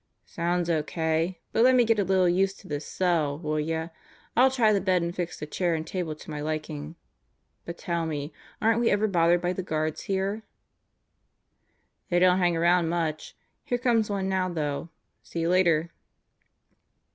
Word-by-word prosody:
"Sounds 175 0 -1
O.K. 160 +2 -1
But 225 - +3
let 255 +1 +6
me 245 -1 +5
get 225 -1 +2
a - - +3
little 190 -1 +3
used 190 +2 +1
to - - -15
this 145 0 -4
cell, 165 -6 0
will 155 -1 -2
ya? 160 +2 -2 0.5
I'll 260 +2 +6
try 235 -5 +3
the 200 - +1
bed 185 -3 +2
and 170 +1 -3
fix 175 -1 -4
the - - -4
chair 170 +2 -1
and 160 0 -4
table 165 -2 -3
to 155 - -11
my 150 -1 -4
liking. 155 0 -4 0.7
But 170 0 -6
tell 170 -2 -2
me; 150 -1 -4 0.3
aren't 225 +1 +2
we 235 - +3
ever 210 +1 +2
bothered 175 -2 +3
by 175 +1 +1
the 190 - -3
guards 155 -3 -2
here?" 195 +3 -1 1.7
"They 175 - +2
don't 180 +1 +5
hang 175 -2 +2
around 170 0 +3
much. 165 -2 -2 0.3
Here 245 - -1
comes 235 -3 +1
one 195 -2 -1
now, 190 -1 0
though. 150 -2 -3 0.3
See 170 - -5
you 165 - 0
later." 170 -3 +3
175 Hz, 180 wpm, -27 LUFS, 160-190 Hz, 1.7 s, let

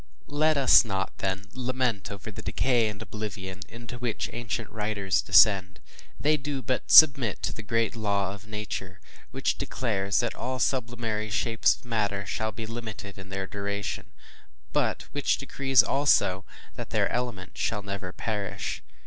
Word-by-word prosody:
Let 155 +1 +2
us 135 -2 +7
not 95 -4 -3
then, 95 +1 -2
lament 125 -4 -1
over 100 -1 -7
the - - -8
decay 120 -4 +1
and 105 -1 -8
oblivion 95 -4 -6
into 120 +1 -9
which 120 -3 -2
ancient 115 -1 -4
writers 105 -3 0
descend; 95 -2 +5 0.4
they 155 +1 +3
do 140 -2 -4
but 130 +2 -2
submit 135 -9 +7
to - - -1
the - - -7
great 115 +1 0
law 100 -3 0
of 100 +1 -12
Nature, 105 -3 -5 0.3
which - - -1
declares 100 -6 0
that 120 -2 -2
all 130 +2 -3
sublunary 115 -4 -1
shapes 115 +2 +2
of - - -20
matter 105 -4 -1
shall 110 +2 -2
be 110 +2 -6
limited 110 -3 -7
in 95 0 -11
their 95 0 -3
duration, 100 -1 -4 0.7
but - - 0
which 145 -1 +1
decrees, 135 -2 +3
also, 105 -9 +2 0.3
that - - -6
their - - +2
element 120 -7 -4
shall 105 -2 -1
never 100 -2 -5
perish. 100 -2 -4
110 Hz, 155 wpm, -27 LUFS, 100-120 Hz, 0.7 s, us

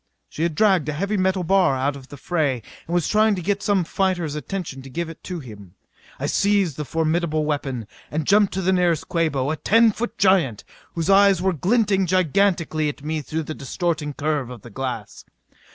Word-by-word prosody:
She - - -7
had 165 -2 0
dragged 190 -6 +3
a - - -1
heavy 200 +7 -1
metal 190 -1 +1
bar 180 -5 +3
out 135 +2 0
to 140 - -9
the 140 +2 -12
fray 140 - -1 0.2
and 170 - -4
was 175 - +1
trying 215 0 +3
to 180 - -4
get 200 +2 0
some 200 -3 +2
fighter's 175 -3 -1
attention 150 -2 -5
and 135 - -11
give 170 +4 -3
it 165 - -12
to 180 -2 -4
him. 100 -7 -12 0.4
I - - -2
seized 200 -6 +2
the 150 - -4
formidable 160 0 0
weapon 135 -6 -2 0.2
and 155 0 -2
jumped 200 +1 +3
at 190 - -2
the 190 - +3
nearest 175 -4 +1
Quabo, 155 -6 0
a 160 - -2
ten 225 +5 +4
foot 235 +3 -5
giant 175 - +2 0.3
whose 170 +3 0
eyes 195 -1 +5
were 190 +1 +1
glinting 195 - +1
gigantically 175 -3 +1
at 145 - -8
me 155 0 -2
through 160 +3 -3
the 155 - -5
distorting 155 +1 -3
curve 145 -4 -1
of 125 -4 -10
the 120 - -11
glass. 125 -3 -5
165 Hz, 200 wpm, -22 LUFS, 145-190 Hz, 0.4 s, eyes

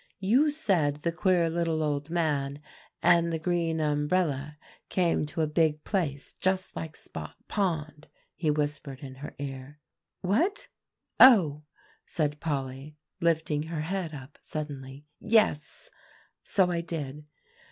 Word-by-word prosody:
"You 245 +11 +4
said 165 - +1
the 170 - +1
queer 175 -1 +2
little 165 -1 0
old 145 0 -1
man 145 -4 0 0.4
and 170 -1 +5
the 165 - 0
green 165 -1 0
umbrella 150 -1 0 0.3
came 170 -4 +1
to 160 - -3
a - - +3
big 155 0 +1
place 150 -8 -2
just 190 0 -1
like 160 -1 -5
Spot - - -8
Pond," 155 -6 -2 0.3
he 160 - -1
whispered 145 -2 -2
in 135 -2 -8
her 145 - -7
ear. 135 +1 -7 0.4
"What 315 - +1 0.5
oh!" 165 - +7 0.4
said 150 -2 -1
Polly, 140 -1 -4 0.2
lifting 160 -3 +1
her 160 -2 -3
head 180 0 -2
up 135 +1 -11
suddenly. 140 -2 -6
"Yes, 160 -9 +1 0.5
so 185 -3 +2
I 170 -1 0
did. 150 -3 -6
155 Hz, 130 wpm, -28 LUFS, 145-175 Hz, 0.5 s, oh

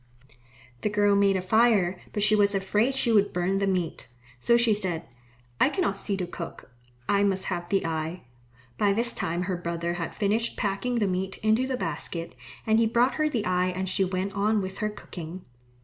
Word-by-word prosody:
The - - 0
girl 205 -1 +3
made 200 -1 +3
a 185 - -3
fire, 205 -4 +3
but 205 - -1
she 215 +1 +5
was 205 -1 +3
afraid 210 +7 +1
she 265 -3 +2
would 205 -2 +4
burn 180 +2 0
the 200 0 0
meat, 180 -4 -2 0.3
so 235 - +4
she 235 -2 +3
said, 185 - -2 0.5
"I - - +5
cannot 335 - 0
see 195 0 -2
to 185 - -2
cook. 170 -6 -8 0.4
I 200 0 +3
must 190 -1 +1
have 175 0 -5
the 195 0 +1
eye." 160 +2 -3 0.6
By 200 -1 +3
this 235 +3 +1
time 170 +2 -2
her 185 0 -2
brother 170 0 -3
had 165 - -4
finished 220 +3 0
packing 205 +4 -1
the 225 -3 +2
meat 190 0 -2
into 220 +4 +3
the 260 -1 -2
basket, 165 -1 -4 0.3
and 220 0 +3
he 230 - +4
brought 240 +3 +2
her 305 - +3
the 235 -8 -2
eye 180 0 +1
and 185 +1 -3
she 190 +1 +1
went 190 +1 -2
on 210 +2 +1
with 190 0 -5
her 210 - 0
cooking. 180 -3 -9
195 Hz, 200 wpm, -26 LUFS, 180-215 Hz, 0.6 s, she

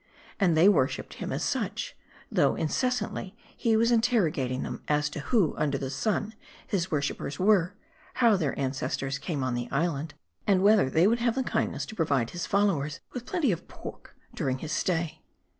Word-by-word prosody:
And 175 -6 +3
they 170 +5 +7
worshiped 150 -10 +2
him - - -3
as - - -2
such, - - -2 0.4
though - - +3
incessantly 210 - -1 0.2
he 225 -2 +2
was 230 +2 +3
interrogating 175 - +2
them, - - -5
as 150 0 +1
to 150 - -5
who 180 - +2
under 145 -2 +1
the 135 -1 -4
sun 210 +9 -1 0.3
his 190 -3 -1
worshipers 145 -1 -2
were; 190 -1 +3 0.4
how 235 -4 +5
their 155 -8 -1
ancestors 135 0 -2
came 150 -7 -3
on 130 -1 -1
the 120 0 -3
island; 150 0 -1 0.3
and 195 -2 +4
whether 205 -8 +5
they 160 +6 +4
would 230 +4 +3
have 235 0 +1
the 265 - 0
kindness 220 -2 -1
to 220 - -9
provide 140 - +1
his 175 - -4
followers 170 -8 +1
with 245 -1 -6
plenty 330 - +1
of 170 - -4
pork - - -10 0.2
during 130 -1 -1
his 155 +4 -6
stay. 165 +1 -1
170 Hz, 175 wpm, -28 LUFS, 140-215 Hz, 0.4 s, they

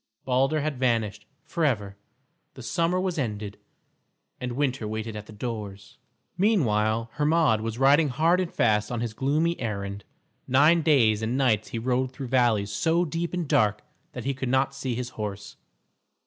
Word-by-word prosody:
Balder 135 +4 +2
had 145 -3 -3
vanished 110 -5 0 0.2
forever, 130 - -1 0.6
the - - -10
summer 170 +1 0
was 185 -3 -2
ended, 105 -5 -4 0.8
and 125 -1 -4
winter 130 -4 -1
waited 110 +1 -4
at 105 0 -7
the - - -11
doors. 105 -2 -7 0.4
Meanwhile 115 - +2
Hermod 150 -6 +2
was 115 0 -4
riding 140 +3 +4
hard 165 +7 +2
and 180 -2 -2
fast 105 0 +1
on 120 -2 -2
his 115 -2 -3
gloomy 155 +8 0
errand. 100 -3 -4 0.4
Nine 150 +6 +5
days 120 -9 +3
and 115 +3 -1
nights 120 -6 +2
he - - -5
rode 125 +2 0
through 130 -1 -6
valleys 115 -6 +2
so 165 +12 +1
deep 165 +2 -3
and 175 -3 -3
dark 105 -4 +2 0.3
that 125 -2 -7
he 140 - 0
could 130 -1 -4
not 130 +1 +2
see 135 -3 -3
his 125 +1 -4
horse. 105 -3 -6
125 Hz, 160 wpm, -26 LUFS, 110-150 Hz, 0.8 s, Nine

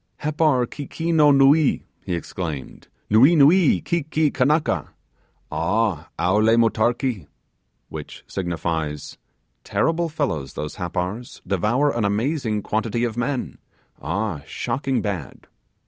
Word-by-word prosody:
'Happar 150 -4 +1
keekeeno 155 +3 +1
nuee,' 140 +2 +4 0.2
he 90 - -2
exclaimed, 80 -5 -6 0.2
'nuee, 130 +11 +6
nuee, 160 +3 +5
ki 170 0 0
ki 155 0 0
kannaka! 150 +4 +1 0.6
ah! 90 -2 0
owle 105 +6 +3
motarkee!' 115 - +1 0.6
which - - -9
signifies, 80 -4 -3 0.4
'Terrible 165 +1 0
fellows 105 - -2
those 75 - -5
Happars! 90 +6 -4
devour 120 +10 +1
an 120 - 0
amazing 110 +1 0
quantity 110 +2 -1
of 115 -3 -1
men! 125 +2 -3 0.4
ah, 100 -8 -2
shocking 135 -3 -2
bad! 95 - -5
115 Hz, 105 wpm, -22 LUFS, 95-145 Hz, 0.6 s, nuee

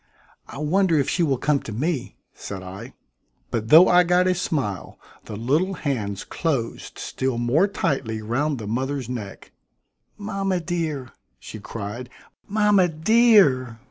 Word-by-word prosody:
"I - - -10
wonder 165 +3 +2
if 140 - +1
she 180 - 0
will 140 -6 +2
come 145 +2 +1
to 115 - -9
me?" 140 +5 -3 0.2
said 95 -2 -8
I. 95 +7 -9 0.6
But 110 -1 -2
though 160 +8 +8
I 180 0 +6
got 180 +1 +3
a 185 - +3
smile, 135 - -3 0.3
the 110 - -7
little 150 - 0
hands 110 - -3
closed 135 -9 -3
still 130 -2 -3
more 125 +11 +2
tightly 135 - -2
round 135 +7 -1
the 110 - -7
mother's 130 +4 -2
neck. 115 -6 -7 0.7
"Mama 195 -2 -2
dear!" 160 -7 -3 0.3
she 110 - -10
cried, 110 +4 -7 0.4
"mama 205 -3 +3
dear!" 160 - +4
140 Hz, 140 wpm, -23 LUFS, 115-175 Hz, 0.7 s, though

